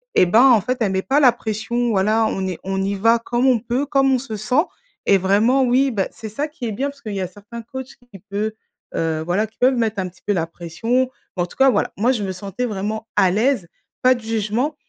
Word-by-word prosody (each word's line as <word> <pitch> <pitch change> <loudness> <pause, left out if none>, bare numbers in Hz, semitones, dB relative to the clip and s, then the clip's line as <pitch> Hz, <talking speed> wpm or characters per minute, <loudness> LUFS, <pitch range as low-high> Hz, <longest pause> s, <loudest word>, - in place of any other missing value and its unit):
Et - - +6
bah, 220 +8 +5
en 245 -5 +7
fait, 250 +6 -2
elle 200 -3 +2
met 190 0 0
pas 285 +3 +2
la 255 -3 +7
pression, 235 +1 -2
voilà, 215 +3 +2
on 190 -2 -2
est 180 -3 -4
on 195 0 -2
y 200 +1 -1
va 230 +4 +3
comme 240 +2 -1
on 250 -3 +4
peut, 245 +5 -1
comme 270 -1 +2
on 255 - +3
se 240 -4 -6
sent 250 - +1 0.4
et 200 - +5
vraiment 215 +8 +3
oui 260 +2 +3
bah, 200 -4 -1
c'est 220 - -8
ça 285 +8 -3
qui 300 -5 -8
est 220 - -2
bien, 275 +7 -2
parce 280 0 -14
qu'il 215 -2 -6
y 195 - -2
a 185 - -2
certains 205 +5 -10
coachs 260 +2 -7 0.2
qui 195 - -11
peut, 210 +2 -2 0.4
heu, 160 -1 -1
voilà 190 +6 0
qui 220 - -31
peuvent 255 +1 +3
mettre 220 -3 0
un 185 -1 -2
petit 175 - -24
peu 205 - +1
la 165 -3 -1
pression. 225 +10 -1 0.3
Mais 175 - +2
en - - -1
tout - - -15
cas 270 0 +6
voilà, - - +1
moi 235 +6 +3
je 220 -5 -1
me 190 - -2
sentais 200 +6 -4
vraiment 215 +1 -3
à 185 -2 +4
l'aise, 220 -3 +1 0.3
pas 255 0 +6
de 240 - -8
jugement 225 +6 -1
220 Hz, 260 wpm, -21 LUFS, 195-250 Hz, 0.4 s, en